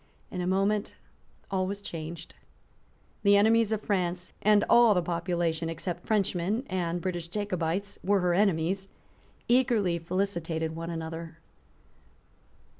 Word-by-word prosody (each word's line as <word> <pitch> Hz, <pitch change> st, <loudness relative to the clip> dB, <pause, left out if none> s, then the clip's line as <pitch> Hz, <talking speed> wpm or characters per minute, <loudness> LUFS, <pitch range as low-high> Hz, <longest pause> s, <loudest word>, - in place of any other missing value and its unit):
In 180 Hz, -, -3 dB
a 180 Hz, -, -2 dB
moment 200 Hz, +3 st, +1 dB, 0.6 s
all 185 Hz, -1 st, 0 dB
was 200 Hz, +1 st, -3 dB
changed. 165 Hz, -3 st, -7 dB, 0.9 s
The 200 Hz, -1 st, +5 dB
enemies 225 Hz, +1 st, +4 dB
of 215 Hz, -1 st, 0 dB
France, 180 Hz, -2 st, -1 dB
and 210 Hz, 0 st, +4 dB
all 235 Hz, -3 st, +6 dB
the 180 Hz, -, +3 dB
population, 170 Hz, -1 st, -1 dB
except 170 Hz, +2 st, -5 dB
Frenchmen 205 Hz, +2 st, 0 dB
and 175 Hz, -2 st, -1 dB
British 175 Hz, -2 st, -3 dB
Jacobites, 195 Hz, 0 st, -2 dB
were 200 Hz, 0 st, +2 dB
her 180 Hz, -1 st, +2 dB
enemies, 190 Hz, 0 st, +1 dB, 0.6 s
eagerly 230 Hz, -8 st, +3 dB
felicitated 165 Hz, -3 st, -2 dB
one 165 Hz, +1 st, -5 dB
another. 165 Hz, 0 st, -6 dB
180 Hz, 120 wpm, -28 LUFS, 170-200 Hz, 0.9 s, all